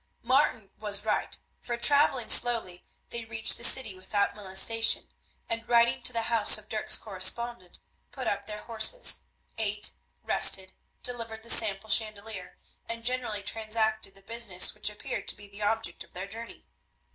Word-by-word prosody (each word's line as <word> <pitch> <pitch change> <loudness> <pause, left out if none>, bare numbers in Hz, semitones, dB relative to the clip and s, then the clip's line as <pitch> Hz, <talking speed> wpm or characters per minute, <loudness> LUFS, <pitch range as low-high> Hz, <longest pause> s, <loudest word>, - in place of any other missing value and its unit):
Martin 250 -5 +1
was 205 -1 0
right, 215 - -1 0.2
for 240 -1 -5
travelling 275 -2 +3
slowly 225 -7 +1 0.3
they 235 -1 -5
reached 220 -1 +3
the - - -7
city 240 -3 +2
without 190 +2 -2
molestation, 210 +3 +1 0.3
and, 230 0 -5
riding 235 0 +3
to - - +3
the 230 -1 -2
house 225 -2 +3
of 215 0 -12
Dirk's 215 -1 +1
correspondent, 205 0 -3 0.3
put 260 -2 -8
up 200 0 -3
their 210 -1 -8
horses; 235 - +2 0.3
ate, 210 -1 0 0.3
rested, 190 -1 +3 0.3
delivered 230 -3 -5
the 235 - +3
sample 215 -1 +4
chandelier, 215 -3 0 0.3
and 230 0 -5
generally 245 -5 -2
transacted 220 -1 -1
the 195 - -18
business 225 -4 +1
which 210 0 +1
appeared 210 - -7
to - - 0
be 205 0 -14
the 200 +1 -12
object 225 -3 -2
of - - -25
their 185 +2 -6
journey. 225 +3 -9
220 Hz, 155 wpm, -28 LUFS, 200-235 Hz, 0.3 s, sample